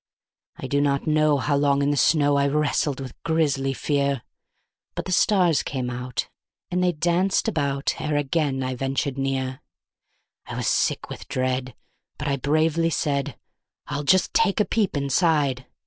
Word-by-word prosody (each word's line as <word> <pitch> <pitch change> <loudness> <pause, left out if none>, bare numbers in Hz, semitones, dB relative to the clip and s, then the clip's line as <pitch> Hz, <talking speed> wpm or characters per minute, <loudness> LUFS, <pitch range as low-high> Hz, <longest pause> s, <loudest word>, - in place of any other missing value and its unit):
I - - -8
do 140 0 +1
not 140 -1 0
know 155 -1 +3
how 140 +3 0
long 140 0 +2
in 145 - +2
the - - +1
snow 145 0 +3
I 140 0 +3
wrestled 145 -1 0
with 130 -3 -7
grisly 145 -5 +1
fear; 140 -2 -1 0.7
But - - -4
the - - -4
stars 180 -4 +3
came 125 -3 -3
out 125 0 -4 0.4
and 180 +1 +1
they 180 - +3
danced 175 +6 +1
about 140 -8 0
ere 150 -1 0
again 145 -2 0
I 130 0 -2
ventured 135 +1 -2
near; 130 -1 -2 0.9
I - - -6
was - - -3
sick - - +1
with - - -8
dread, 130 0 -2 0.4
but 150 - -4
I 140 -1 0
bravely 155 +4 +1
said: 145 -3 -1 0.5
"I'll 145 -1 -3
just 185 +5 +3
take 200 - +2
a 210 - +3
peep 205 -8 0
inside. 140 -2 +1
145 Hz, 165 wpm, -24 LUFS, 135-155 Hz, 0.9 s, know